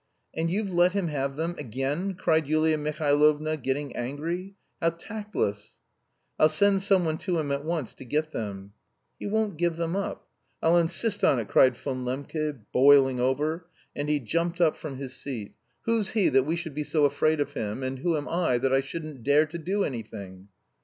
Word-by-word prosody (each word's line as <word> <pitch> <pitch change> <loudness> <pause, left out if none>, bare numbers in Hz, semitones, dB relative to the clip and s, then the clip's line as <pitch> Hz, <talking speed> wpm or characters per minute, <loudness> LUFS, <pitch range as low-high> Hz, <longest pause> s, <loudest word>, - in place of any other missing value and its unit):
"And 165 +1 -1
you've 195 +1 -1
let 175 +1 +4
him 195 -4 0
have 140 -2 -2
them, 165 +3 -2
again!" 145 - -2
cried 160 -3 +1
Yulia 155 +1 +3
Mihailovna 150 +1 +2
getting 135 0 -3
angry. 165 +10 -4 0.3
"How 165 - +4
tactless!" 170 - -4 0.6
"I'll 155 - +6
send 195 +5 +3
someone 180 -5 +2
to 180 -3 -1
him 150 -3 -1
at 140 0 -1
once 160 -6 -3
to - - -11
get 155 +5 -1
them." 100 -4 -6 0.5
"He - - -4
won't 210 -4 0
give 170 0 +1
them 170 +1 -1
up." 200 - -4 0.3
"I'll 170 +2 +4
insist 190 +6 +1
on 135 - +5
it," 115 -3 -3
cried 130 -2 +5
Von 130 -2 -4
Lembke, 145 +2 -3
boiling 135 -1 +6
over, 150 +6 0 0.3
and 145 +1 -3
he 150 -1 +2
jumped 170 +7 -1
up 165 -3 +4
from 150 -4 -7
his 135 -1 -6
seat. 115 -7 -6 0.3
"Who's 225 -4 +1
he 215 -4 +3
that 135 +1 +3
we 165 - +1
should 165 -3 -5
be 150 +2 -2
so 150 0 +2
afraid 150 +2 +2
of 145 0 -1
him, 110 +1 -3
and 130 0 -3
who 165 +2 +1
am 145 - -4
I 165 -7 +1
that 130 +2 +1
I 135 - +5
shouldn't 150 -1 -7
dare 145 +5 +4
to 155 +2 -7
do 195 +5 0
any 125 -9 -2
thing?" 95 -3 -10
155 Hz, 195 wpm, -27 LUFS, 135-170 Hz, 0.6 s, I'll